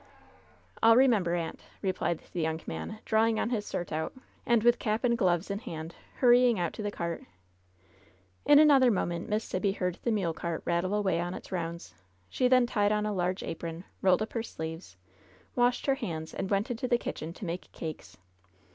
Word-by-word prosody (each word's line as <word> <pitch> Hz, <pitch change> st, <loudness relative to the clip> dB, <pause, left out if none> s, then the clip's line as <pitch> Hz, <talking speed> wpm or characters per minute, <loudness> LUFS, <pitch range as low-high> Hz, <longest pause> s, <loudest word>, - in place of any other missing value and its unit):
"I'll 225 Hz, 0 st, +7 dB
remember, 225 Hz, -9 st, +4 dB
aunt," 165 Hz, -2 st, -3 dB, 0.2 s
replied 185 Hz, -3 st, -1 dB
the 175 Hz, -, -1 dB
young 160 Hz, 0 st, -1 dB
man, 80 Hz, -, -5 dB
draw 220 Hz, 0 st, +3 dB
ing 225 Hz, -1 st, +1 dB
on 235 Hz, -, -1 dB
his 210 Hz, -4 st, -1 dB
"surtout," 160 Hz, -2 st, -3 dB, 0.3 s
and, 235 Hz, -2 st, +3 dB
with 240 Hz, 0 st, +4 dB
cap 215 Hz, +2 st, -1 dB
and 240 Hz, -1 st, +3 dB
gloves 185 Hz, -3 st, +1 dB
in 200 Hz, -, -2 dB
hand, 165 Hz, -6 st, -7 dB, 0.2 s
hurrying 245 Hz, -2 st, +5 dB
out 175 Hz, -2 st, -1 dB
to -, -, -6 dB
the 205 Hz, -, -1 dB
cart. 170 Hz, -4 st, -4 dB, 1.2 s
In 290 Hz, -, +7 dB
another 285 Hz, -4 st, +7 dB
moment 175 Hz, -5 st, -1 dB
Miss 215 Hz, +1 st, 0 dB
Sibby 195 Hz, +1 st, -1 dB
heard 180 Hz, -3 st, -2 dB
the -, -, -1 dB
mule 190 Hz, -7 st, 0 dB
cart 170 Hz, 0 st, -4 dB
rattle 175 Hz, +3 st, 0 dB
away 190 Hz, -5 st, +1 dB
on 175 Hz, +1 st, -3 dB
its -, -, -10 dB
rounds. 170 Hz, -2 st, -4 dB, 0.4 s
She 255 Hz, -, +1 dB
then 255 Hz, -1 st, +5 dB
tied 205 Hz, -4 st, +1 dB
on 210 Hz, 0 st, +1 dB
a 210 Hz, -, -1 dB
large 185 Hz, 0 st, -1 dB
apron, 165 Hz, +1 st, -5 dB, 0.2 s
rolled 185 Hz, +2 st, +4 dB
up 220 Hz, -, -8 dB
her 230 Hz, -, -1 dB
sleeves, 160 Hz, -, -7 dB, 0.6 s
washed 245 Hz, 0 st, +2 dB
her 275 Hz, -, +3 dB
hands, 165 Hz, -, -5 dB
and 190 Hz, -, -3 dB
went 205 Hz, +5 st, 0 dB
into 250 Hz, +2 st, -2 dB
the 240 Hz, -, +3 dB
kitchen 165 Hz, -8 st, -5 dB
to 195 Hz, -, -8 dB
make 175 Hz, +1 st, -5 dB
cakes. 160 Hz, -2 st, -7 dB
195 Hz, 190 wpm, -29 LUFS, 170-230 Hz, 1.2 s, I'll